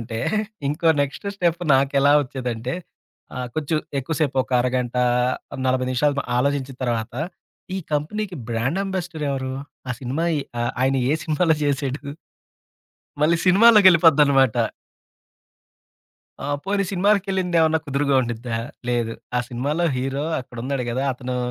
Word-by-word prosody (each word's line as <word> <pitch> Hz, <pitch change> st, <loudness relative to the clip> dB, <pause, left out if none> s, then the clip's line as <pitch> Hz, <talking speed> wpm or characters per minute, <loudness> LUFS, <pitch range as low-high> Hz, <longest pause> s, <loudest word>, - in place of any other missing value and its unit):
ఫ్లేవరుంటే, 115 Hz, 0 st, -5 dB, 0.5 s
ఇంకో 165 Hz, +3 st, +1 dB
next 140 Hz, +7 st, -3 dB
step 175 Hz, -2 st, 0 dB
నాకెలా 140 Hz, +1 st, +3 dB
వచ్చేదంటే, 125 Hz, -3 st, -4 dB, 0.6 s
ఆహ్, 125 Hz, -1 st, -3 dB
కొంచెం 155 Hz, 0 st, 0 dB, 0.2 s
ఎక్కువ 145 Hz, +5 st, -3 dB
సేపు 140 Hz, -3 st, 0 dB
ఒక -, -, -11 dB
అరగంట, 125 Hz, 0 st, -1 dB, 0.7 s
40 130 Hz, 0 st, +1 dB
నిమిషాలు 145 Hz, +2 st, +1 dB
ఆలోచించిన 135 Hz, 0 st, -1 dB
తర్వాత, 115 Hz, -1 st, -2 dB, 0.6 s
ఈ -, -, -1 dB
కంపెనీకి 180 Hz, +6 st, -2 dB
బ్రాండ్ 120 Hz, +10 st, -1 dB
అంబాసడర్ 175 Hz, -5 st, -4 dB
ఎవరు? 130 Hz, -1 st, -3 dB, 0.4 s
ఆ -, -, -2 dB
సినిమా 135 Hz, +5 st, -2 dB, 0.6 s
ఆయన 135 Hz, +1 st, +2 dB, 0.2 s
ఏ -, -, +3 dB
సినిమాలో 160 Hz, 0 st, +2 dB
చేసాడు, 140 Hz, 0 st, -1 dB, 1.2 s
మళ్ళి 165 Hz, +2 st, +4 dB
సినిమాలోకెళ్ళిపోద్దనమాట. 170 Hz, -, +6 dB, 1.9 s
ఆహ్, 145 Hz, 0 st, -1 dB
పోనీ 200 Hz, 0 st, 0 dB
సినిమాలకెళ్ళింది 190 Hz, -2 st, +1 dB
ఏమన్నా 160 Hz, 0 st, +3 dB
కుదురుగా 140 Hz, 0 st, +1 dB
ఉండిద్దా, 120 Hz, -1 st, -3 dB, 0.3 s
లేదు 120 Hz, -2 st, 0 dB, 0.2 s
ఆ -, -, +3 dB
సినిమాలో 145 Hz, +8 st, -1 dB
హీరో 135 Hz, +3 st, -2 dB, 0.2 s
అక్కడున్నాడు 125 Hz, +1 st, -4 dB
గదా! 130 Hz, +3 st, -1 dB
అతను 125 Hz, 0 st, -5 dB
140 Hz, 115 wpm, -22 LUFS, 125-165 Hz, 1.9 s, సినిమాలోకెళ్ళిపోద్దనమాట